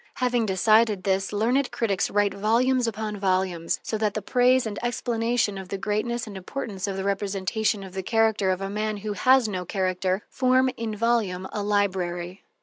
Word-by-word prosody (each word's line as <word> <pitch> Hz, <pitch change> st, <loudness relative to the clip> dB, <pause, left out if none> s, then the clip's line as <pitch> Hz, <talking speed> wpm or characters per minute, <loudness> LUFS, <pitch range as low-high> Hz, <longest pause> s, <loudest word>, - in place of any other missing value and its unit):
Having 245 Hz, -3 st, +1 dB
decided 215 Hz, +1 st, +3 dB
this, 195 Hz, 0 st, 0 dB
learned 240 Hz, +6 st, +1 dB
critics 200 Hz, -5 st, 0 dB
write 205 Hz, -1 st, +1 dB
volumes 240 Hz, +4 st, +2 dB
upon 215 Hz, -1 st, -3 dB
volumes, 185 Hz, -3 st, 0 dB
so 220 Hz, -, -3 dB
that 210 Hz, -1 st, 0 dB
the 215 Hz, -, -2 dB
praise 250 Hz, +2 st, +3 dB
and 210 Hz, -2 st, -4 dB
explanation 235 Hz, -3 st, 0 dB
of 190 Hz, -, -8 dB
the 195 Hz, -, -3 dB
greatness 225 Hz, +4 st, -2 dB
and 210 Hz, -3 st, -9 dB
importance 195 Hz, 0 st, -5 dB
of 195 Hz, -1 st, -3 dB
the 190 Hz, -, -3 dB
representation 200 Hz, +1 st, -1 dB
of 190 Hz, -1 st, -10 dB
the 190 Hz, -, -3 dB
character 220 Hz, -1 st, +2 dB
of 185 Hz, 0 st, 0 dB
a 195 Hz, -, -2 dB
man 215 Hz, 0 st, -2 dB
who 210 Hz, +1 st, -4 dB
has 255 Hz, +3 st, +4 dB
no 185 Hz, -3 st, -3 dB
character 185 Hz, +1 st, -1 dB
form 255 Hz, 0 st, +2 dB
in 225 Hz, -2 st, -4 dB
volume 210 Hz, -5 st, 0 dB
a 210 Hz, -, -2 dB
library. 185 Hz, -3 st, -1 dB
210 Hz, 180 wpm, -25 LUFS, 190-230 Hz, -, has